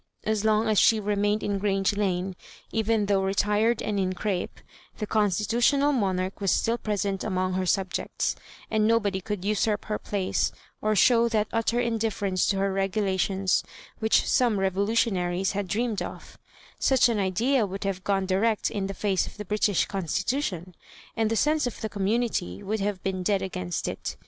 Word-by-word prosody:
As 215 -1 0
long 220 +1 +2
as 215 -2 +3
she 225 - +5
remained 205 0 0
in 200 -1 -1
Grange 195 0 +1
Lane, 190 -2 -1 0.4
even 220 -1 +1
though 200 -1 +2
retired 210 +4 +1
and 205 -2 -1
in 185 -1 0
crape, 185 -1 -3 0.4
the 215 - -3
constitutional 225 +8 +2
monarch 190 -4 -1
was 195 - +1
still 230 +5 +1
present 200 -2 -2
among 185 -2 -1
her 185 0 -1
subjects; 190 -1 -1 0.4
and 215 -1 +2
nobody 210 -4 +1
could 200 -1 -4
usurp 210 0 0
her 210 -1 -2
place 195 -2 -1 0.3
or 215 0 +1
show 235 +3 +5
that 215 -2 0
utter 230 +1 +1
indifference 220 -5 0
to 195 - +1
her 195 0 0
regulations 195 -1 0 0.4
which 220 0 +2
some 235 -5 +2
revolutionaries 190 -2 +1
had 200 -1 -3
dreamed 220 +2 -1
oC - - -8 0.4
Such 265 -2 +4
an 230 -3 0
idea 220 +5 +1
would 195 +1 -6
have 195 -2 -3
gone 195 -1 +1
di 185 0 +1
rect 220 +1 +1
in 195 -2 -2
the 195 - -6
face 195 -2 0
of - - -11
the 210 - -6
British 210 -2 +1
Constitution, 190 - -2 0.4
and 225 -2 +1
the 225 - 0
sense 300 +2 +2
of 240 - -6
the 220 - -3
community 200 - -1
would 215 +2 -2
have 200 -2 -2
been 190 -1 -2
dead 195 +1 +1
agamst 90 - -3
It. - - -5
205 Hz, 175 wpm, -26 LUFS, 190-220 Hz, 0.4 s, she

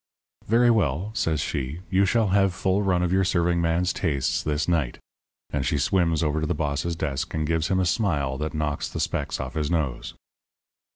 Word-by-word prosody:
"'Very 120 +2 +4
well,' 95 - 0
says 80 -8 0
she. 70 +6 -3
'You 95 +1 +4
shall 110 0 +2
have 95 -1 +2
full 95 +1 +1
run 90 -3 +1
of 90 - 0
your 95 0 +3
serving 85 -2 +1
man's 85 +2 +1
tastes 70 -7 0
this 75 +1 -1
night.' 80 -8 0 0.5
And 70 -2 -1
she 75 +3 0
swims 85 +2 +1
over 75 0 0
to 80 - -1
the 90 - 0
boss's 75 +3 -1
desk 80 +1 -3
and 80 -1 0
gives 80 0 0
him 95 - +1
a 95 - +2
smile 75 - 0
that 75 0 -3
knocks 75 -2 -2
the - - -5
specks - - -2
off - - -5
his 75 -2 -1
nose. 75 -8 -2
85 Hz, 195 wpm, -25 LUFS, 75-95 Hz, 0.5 s, Very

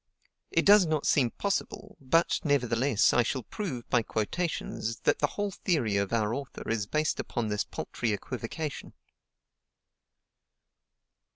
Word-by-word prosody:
It - - +1
does 200 -3 +7
not 155 -2 0
seem 130 -5 +3
possible, 200 - -3
but, 165 +6 +2
nevertheless, 125 -4 +2
I 120 - +5
shall 130 +1 -2
prove, 130 - -5
by 125 - +4
quotations, 115 0 -3
that - - +2
the - - +3
whole 205 -1 -3
theory 145 - 0
of 100 -1 -1
our 110 -1 +1
author 140 +1 -6
is 110 -2 -1
based 155 +5 0
upon 115 -2 -2
this 105 0 -1
paltry 115 - -3
equivocation. 125 +7 -5
130 Hz, 130 wpm, -29 LUFS, 115-160 Hz, -, does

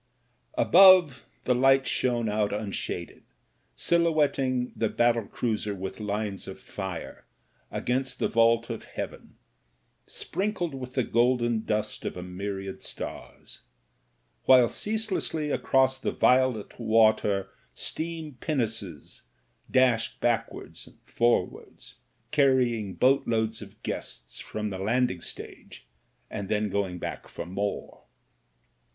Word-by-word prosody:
Above, 185 - +6 0.2
the 125 - +2
lights 135 +2 +4
shone 120 -2 +1
out 105 -1 0
unshaded, 100 -4 -4 0.5
silhouetting 145 -7 +1
the 110 - 0
battle 115 -3 +2
cruiser 105 -3 -2
with 95 +2 -6
lines 105 -1 -3
of 95 - -8
fire 95 -4 -7 0.5
against 130 +1 -2
the - - +1
vault 115 +1 +3
of 115 - -5
heaven, - - -7 0.7
sprinkled 190 -5 -2
with 130 -1 -7
the 130 - +2
golden 120 -1 +2
dust 105 0 -2
of - - -4
a 90 - -5
myriad 95 +1 -5
stars; - - -8 0.9
while 130 -2 +7
ceaselessly 205 -8 -1
across 130 -1 +2
the - - -1
violet 125 -5 +2
water 110 -3 +3 0.2
steam 160 -2 -3
pinnaces 110 - -3 0.5
dashed 125 -3 +2
backwards 120 -2 -2
and - - -18
forwards, 120 0 -1 0.3
carry 130 -5 +3
ing 105 -4 -5
boatloads 115 -4 +2
of 105 +1 -12
guests - - -5
from 105 -1 -4
the 95 - -5
landing 110 -2 0
stage, - - -9 0.4
and 100 -2 -6
then 105 -1 0
going 95 -3 -1
back - - -6
for 85 - -7
more. 100 +3 -4
115 Hz, 115 wpm, -27 LUFS, 105-130 Hz, 0.9 s, while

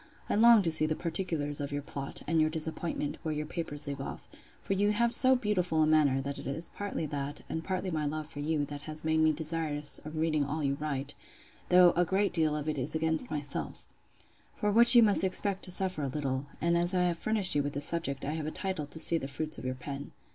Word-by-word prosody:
I - - +2
long 225 0 +6
to 165 - +1
see 155 -1 +6
the 155 - -1
particulars 160 -4 -2
of 145 0 -4
your 145 0 -3
plot, 140 -1 -3
and 165 0 +1
your 155 - +2
disappointment, 160 -1 -2
where 155 -2 -3
your 150 0 -3
papers 155 -2 -4
leave 140 -1 -5
off: - - -8 0.4
for - - -1
you 205 +2 +1
have 235 +2 +1
so 260 0 +4
beautiful 180 -9 0
a - - +4
manner, 150 -4 +3
that 140 +1 -5
it - - -7
is 155 +5 -2
partly 205 -5 -4
that, 145 0 -5
and 160 - -4
partly 185 0 -3
my 155 -2 -1
love 155 +1 -4
for 145 -1 -10
you, 150 0 -1
that 145 0 -8
has 155 0 -7
made 160 0 +1
me 155 0 +4
desirous 155 -1 -1
of 155 +1 -8
reading 155 -2 0
all 150 +2 -3
you 140 -1 +1
write; 145 -1 -3 0.6
though 180 -1 +6
a 175 - +3
great 190 +3 0
deal 160 -3 +1
of 150 0 -4
it 150 -2 -1
is 130 +5 -2
against 160 0 -1
myself; 145 -2 -4 0.7
for 210 - -1
which 235 +3 +9
you 235 - +8
must 205 -3 +3
expect 190 +1 +1
to 180 - -2
suffer 185 -3 +1
a 140 - -1
little: 135 0 -3
and 170 +1 +1
as 175 +2 +1
I 180 - +2
have 175 -2 -1
furnished 215 -3 +2
you 145 - +2
with 145 0 -4
the 145 - -3
subject, 145 -3 -1
I 145 - -2
have 155 -1 -4
a - - -3
title 185 -6 -3
to 160 - -4
see 165 +1 +5
the 135 - -5
fruits 155 +3 -4
of - - -9
your 130 0 -2
pen. 140 +2 -8
155 Hz, 245 wpm, -30 LUFS, 145-180 Hz, 0.7 s, which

